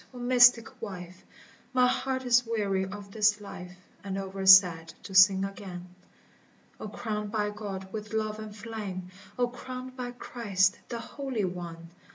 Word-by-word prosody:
O - - -8
mystic 245 -1 +4
wife! 185 -3 -8 0.5
My 250 -1 +4
heart 260 +1 0
is 245 0 +4
weary 205 -5 -1
of 200 +1 -9
this 210 0 +2
life 180 -3 -10 0.3
And 195 -1 -4
over 195 0 -5
sad 175 -4 +7
to 195 - -9
sing 190 0 +6
again. 180 -3 -8 0.9
O - - -6
crowned 210 -1 -4
by 210 -1 -1
God 195 -2 -7
with 215 -1 -6
love 215 -1 -2
and 215 -1 -8
flame! 205 -4 -6 0.3
O 245 -1 +2
crowned 255 +1 -8
by 250 -1 -5
Christ 205 -6 0
the 235 - -4
Holy 255 -3 -3
One 170 -2 -7
210 Hz, 155 wpm, -28 LUFS, 190-235 Hz, 0.9 s, sad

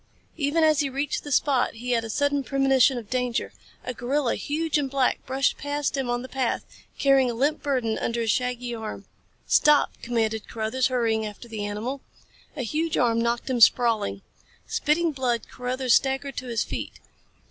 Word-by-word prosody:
Even 315 +1 +1
as 310 -2 +4
he 285 - +1
reached 275 +2 -2
the 290 - -7
spot 265 -3 +2
he 245 +2 -4
had 230 -2 +2
a 225 - -6
sudden 285 +4 +1
premonition 270 -1 +3
of 230 -3 -7
danger. 250 -1 -1 0.3
A 250 - -4
gorilla, 250 +2 0
huge 310 +1 -1
and 275 -2 -2
black, 265 -1 +1
brushed 265 +1 0
past 290 -1 -2
him 265 -3 -2
on 240 0 -1
the - - -7
path, 260 -2 -1 0.3
carrying 270 -2 +4
a 235 - -3
limp 285 +6 +1
burden 250 -6 -1
under 235 0 -1
his 225 -2 +2
shaggy 250 0 -2
arm. 220 -2 -6 0.4
"Stop!" 300 -1 +4
commanded 220 -2 -1
Carruthers, 225 +3 0
hurrying 230 -4 0
after 210 +2 -7
the 220 -3 -5
animal. 220 +7 -4 0.6
A 265 - -2
huge 310 +7 -1
arm 230 -2 +2
knocked 235 0 -1
him 255 -3 -1
sprawling. 220 - +4 0.4
Spitting 320 +2 +1
blood 255 -4 -1
Carruthers 250 0 -1
staggered 270 0 +1
to 255 - -4
his 230 -3 0
feet. - - -6
255 Hz, 180 wpm, -25 LUFS, 235-280 Hz, 0.6 s, as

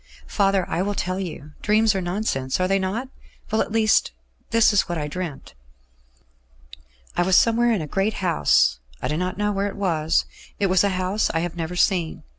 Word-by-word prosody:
"Father, 195 -3 +1
I 175 - -1
will 205 +2 -1
tell 185 0 -2
you. 155 -5 -6
Dreams 215 +1 +3
are 190 - -1
nonsense, 175 -8 -2
are 185 - +1
they 195 +1 +2
not? 210 +8 -3 0.4
Well, 220 - +2
at - - -3
least, 220 -1 +3 0.4
this 230 -1 +4
is 200 - +2
what 175 - -2
I 150 -1 -3
dreamt. 165 -2 -6 1.6
"I - - +1
was 185 +1 +3
somewhere 235 +3 +4
in 205 -8 0
a - - -6
great 195 +7 -1
house; 170 - +2 0.2
I - - -3
do 150 - -1
not 180 +2 -2
know 210 0 0
where 200 0 -1
it 200 - -6
was. 165 -5 +1 0.3
It 200 -2 +1
was 185 0 +4
a 200 - +2
house 185 +3 0
I 165 - +1
have 175 0 -4
never 170 +1 -4
seen. 180 -3 0
190 Hz, 200 wpm, -23 LUFS, 175-205 Hz, 1.6 s, this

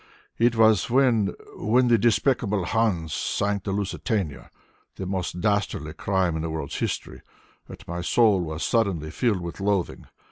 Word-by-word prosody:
It 120 +1 +3
was 110 0 +4
when 120 -5 +2 0.2
when 125 +4 +2
the 120 -2 +4
despicable 110 -4 +1
Huns 90 -8 0
sank 100 0 -1
the 100 - -2
Lusitania, 95 - -2 0.5
the 95 - -5
most 90 -2 -3
dastardly 100 -7 -1
crime 95 -1 0
in 80 - -2
the 80 - -3
world's 80 -3 -4
history, - - -4 0.5
that - - -12
my 85 +1 -4
soul 105 +1 +3
was 80 -1 -4
suddenly 95 -10 0
filled 105 0 0
with 85 +2 -7
loathing. 100 -2 -1
100 Hz, 150 wpm, -25 LUFS, 85-110 Hz, 0.5 s, was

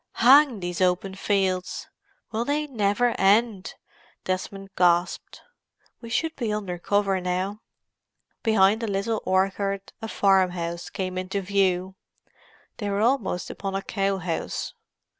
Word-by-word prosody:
"Hang 260 -2 +6
these 175 0 -3
open 185 +1 +1
fields!—will 195 +3 -3
they 295 +4 0
never 235 -2 +1
end!" 200 0 +2 0.5
Desmond 195 +1 -4
gasped. 175 0 +1 0.6
"We 230 - -9
should 320 +7 -1
be 230 -5 -2
under 195 -4 -3
cover 195 0 +1
now." 185 +4 -2 0.8
Behind 220 -1 +3
a 230 - -2
little 210 +2 -1
orchard 195 +1 0
a 225 - -4
farm 195 -3 +3
house 170 -1 -5
came 185 -1 -3
into 185 +2 -3
view; 190 -1 +1 0.8
they 205 -2 -3
were 200 +1 0
almost 225 -6 0
upon 195 -1 -5
a 195 - -2
cow 195 -1 -1
house. 175 -3 -3
195 Hz, 125 wpm, -25 LUFS, 185-220 Hz, 0.8 s, Hang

